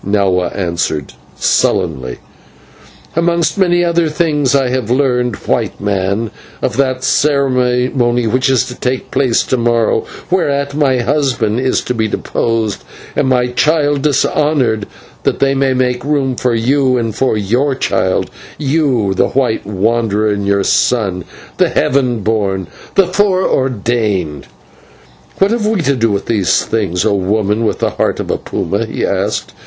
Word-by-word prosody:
Nahua 95 Hz, -3 st, +1 dB
answered, 85 Hz, -6 st, -2 dB, 0.2 s
sullenly. 65 Hz, -7 st, 0 dB, 1.0 s
"Amongst 170 Hz, 0 st, +1 dB
many 175 Hz, -2 st, +3 dB
other 170 Hz, -1 st, +1 dB
things, 150 Hz, -4 st, +1 dB
I 135 Hz, -2 st, +2 dB
have 125 Hz, -3 st, -2 dB
learned, 125 Hz, -3 st, +1 dB
White -, -, -1 dB
Man, 100 Hz, +2 st, -1 dB, 0.3 s
of -, -, -2 dB
that 130 Hz, -2 st, 0 dB
ceremony 125 Hz, -4 st, +1 dB
which 130 Hz, +5 st, +1 dB
is 130 Hz, -2 st, +2 dB
to 125 Hz, -, -7 dB
take 125 Hz, +1 st, -3 dB
place 130 Hz, -4 st, +2 dB
to 130 Hz, -, -1 dB
morrow, 115 Hz, -2 st, +1 dB, 0.3 s
whereat 140 Hz, -6 st, 0 dB
my 135 Hz, -4 st, +2 dB
husband 125 Hz, -5 st, 0 dB
is 130 Hz, 0 st, +1 dB
to 125 Hz, -, -3 dB
be 110 Hz, -2 st, 0 dB
deposed 110 Hz, 0 st, -2 dB, 0.3 s
and 130 Hz, -, +1 dB
my 125 Hz, -1 st, +2 dB
child 145 Hz, +1 st, +2 dB
dishonoured, 140 Hz, -6 st, +1 dB, 0.3 s
that -, -, 0 dB
they 135 Hz, 0 st, +2 dB
may 135 Hz, -1 st, +1 dB
make 125 Hz, -1 st, 0 dB
room 140 Hz, -3 st, 0 dB
for 120 Hz, -1 st, 0 dB
you 130 Hz, +2 st, +2 dB
and 115 Hz, -3 st, -2 dB
for 130 Hz, -4 st, +1 dB
your 125 Hz, +8 st, 0 dB
child 95 Hz, -7 st, 0 dB, 0.3 s
you, 135 Hz, -9 st, +1 dB
the 95 Hz, -, +2 dB
white 125 Hz, -6 st, -1 dB
wanderer, 110 Hz, +1 st, 0 dB
and 100 Hz, -1 st, -2 dB
your 100 Hz, 0 st, +2 dB
son, 95 Hz, -8 st, +1 dB, 0.3 s
the -, -, +3 dB
Heaven 125 Hz, -4 st, +1 dB
born, 100 Hz, -3 st, 0 dB, 0.3 s
the 195 Hz, -, +5 dB
Fore 190 Hz, 0 st, +1 dB
ordained!" 105 Hz, -, -1 dB, 0.9 s
"What 195 Hz, +2 st, +3 dB
have 230 Hz, -2 st, 0 dB
we 215 Hz, -4 st, +1 dB
to 140 Hz, -2 st, +1 dB
do 115 Hz, -2 st, +1 dB
with 100 Hz, 0 st, -2 dB
these 95 Hz, -5 st, +1 dB
things, 95 Hz, -5 st, -1 dB
O 110 Hz, -, +2 dB
woman 105 Hz, +3 st, 0 dB
with -, -, 0 dB
the -, -, 0 dB
heart -, -, -1 dB
of -, -, -3 dB
a -, -, 0 dB
puma?" -, -, -2 dB
he -, -, -2 dB
asked. -, -, -2 dB
125 Hz, 150 wpm, -15 LUFS, 105-140 Hz, 1.0 s, the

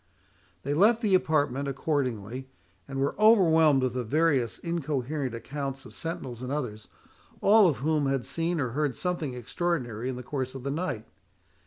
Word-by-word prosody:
They 140 Hz, -, -1 dB
left 220 Hz, +9 st, +4 dB
the 205 Hz, -3 st, +2 dB
apartment 145 Hz, -6 st, +2 dB
accordingly, 130 Hz, -4 st, -2 dB, 0.4 s
and 135 Hz, -, -4 dB
were 140 Hz, +1 st, +1 dB
overwhelmed 160 Hz, -, +5 dB
with 130 Hz, -2 st, 0 dB
the 125 Hz, -1 st, -2 dB
various 140 Hz, -1 st, +1 dB
incoherent 145 Hz, -5 st, -2 dB
accounts 135 Hz, +2 st, -5 dB
of -, -, -12 dB
sentinels 130 Hz, -7 st, -5 dB
and 130 Hz, +1 st, -4 dB
others, 120 Hz, -8 st, -4 dB, 0.5 s
all 210 Hz, 0 st, +6 dB
of 155 Hz, -, +1 dB
whom 155 Hz, -3 st, +2 dB
had 135 Hz, -2 st, 0 dB
seen 165 Hz, 0 st, -1 dB
or 130 Hz, -4 st, 0 dB
heard 145 Hz, +1 st, -1 dB
something 170 Hz, -8 st, -2 dB
extraordinary 125 Hz, -3 st, -2 dB
in 130 Hz, -, -3 dB
the 125 Hz, -, -7 dB
course 130 Hz, 0 st, -4 dB
of 130 Hz, -, -7 dB
the 140 Hz, -, -2 dB
night. 145 Hz, -8 st, -3 dB
140 Hz, 165 wpm, -28 LUFS, 125-165 Hz, 0.5 s, all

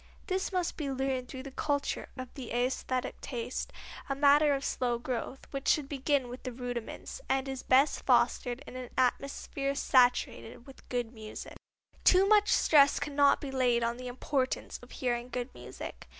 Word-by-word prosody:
This 380 Hz, 0 st, -1 dB
must 365 Hz, -2 st, -1 dB
be 295 Hz, -3 st, -3 dB
learned 265 Hz, -1 st, -1 dB
through 260 Hz, 0 st, -7 dB
the 275 Hz, -, -8 dB
culture 285 Hz, +1 st, -2 dB
of 255 Hz, -1 st, -7 dB
the 255 Hz, -4 st, -7 dB
æsthetic 255 Hz, +1 st, -1 dB
taste, 245 Hz, -1 st, -4 dB, 0.4 s
a 275 Hz, -, 0 dB
matter 290 Hz, +1 st, +5 dB
of 275 Hz, -, -4 dB
slow 245 Hz, -2 st, 0 dB
growth, 250 Hz, +2 st, -4 dB
which 275 Hz, -1 st, -4 dB
should 295 Hz, -3 st, +3 dB
begin 280 Hz, -1 st, 0 dB
with 245 Hz, +1 st, -8 dB
the 255 Hz, -, -5 dB
rudiments, 245 Hz, -, -6 dB
and 265 Hz, 0 st, +1 dB
is 265 Hz, -1 st, -4 dB
best 270 Hz, +3 st, +3 dB
fostered 245 Hz, +2 st, +2 dB
in -, -, -10 dB
an 255 Hz, -1 st, -6 dB
atmosphere 275 Hz, +2 st, 0 dB
saturated 245 Hz, -3 st, +2 dB
with 270 Hz, -, -15 dB
good 245 Hz, -2 st, -2 dB
music. 215 Hz, -2 st, -8 dB, 0.5 s
Too 380 Hz, +1 st, +6 dB
much 420 Hz, 0 st, +5 dB
stress 285 Hz, -2 st, +5 dB
cannot 285 Hz, -1 st, +3 dB
be 280 Hz, -, -5 dB
laid 245 Hz, -3 st, +2 dB
on 235 Hz, +1 st, -1 dB
the 250 Hz, 0 st, -7 dB
importance 255 Hz, +1 st, -2 dB
of 245 Hz, -, -14 dB
hearing 245 Hz, -1 st, -2 dB
good 250 Hz, +1 st, -4 dB
music. -, -, -9 dB
260 Hz, 170 wpm, -31 LUFS, 245-280 Hz, 0.5 s, Too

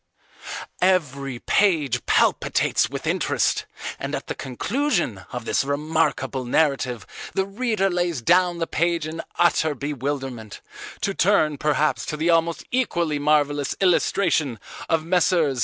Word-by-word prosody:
Every 140 Hz, -8 st, +1 dB
page 150 Hz, -, +1 dB
palpitates -, -, +2 dB
with -, -, -6 dB
interest, -, -, 0 dB, 0.3 s
and -, -, -3 dB
at -, -, -5 dB
the -, -, -4 dB
conclusion 140 Hz, -, -2 dB
of 125 Hz, -2 st, -5 dB
this -, -, +1 dB
remarkable 145 Hz, -1 st, -1 dB
narrative 125 Hz, -3 st, 0 dB, 0.3 s
the 190 Hz, -, +1 dB
reader 210 Hz, -1 st, 0 dB
lays 175 Hz, -5 st, -1 dB
down 175 Hz, +6 st, +3 dB
the 165 Hz, -, -1 dB
page 170 Hz, -1 st, 0 dB
in 160 Hz, +1 st, -5 dB, 0.2 s
utter 160 Hz, -3 st, +2 dB
bewilderment, 135 Hz, -5 st, -4 dB, 0.4 s
to 195 Hz, -, 0 dB
turn 155 Hz, -6 st, +2 dB
perhaps 150 Hz, 0 st, +1 dB
to 150 Hz, -, -3 dB
the 165 Hz, +3 st, +2 dB
almost 165 Hz, 0 st, +1 dB
equally 170 Hz, -, 0 dB
marvellous 145 Hz, -1 st, +1 dB
illustration 170 Hz, -, +2 dB, 0.3 s
of 160 Hz, -1 st, +1 dB
Messrs. 170 Hz, -6 st, +2 dB
155 Hz, 125 wpm, -23 LUFS, 140-175 Hz, 0.4 s, down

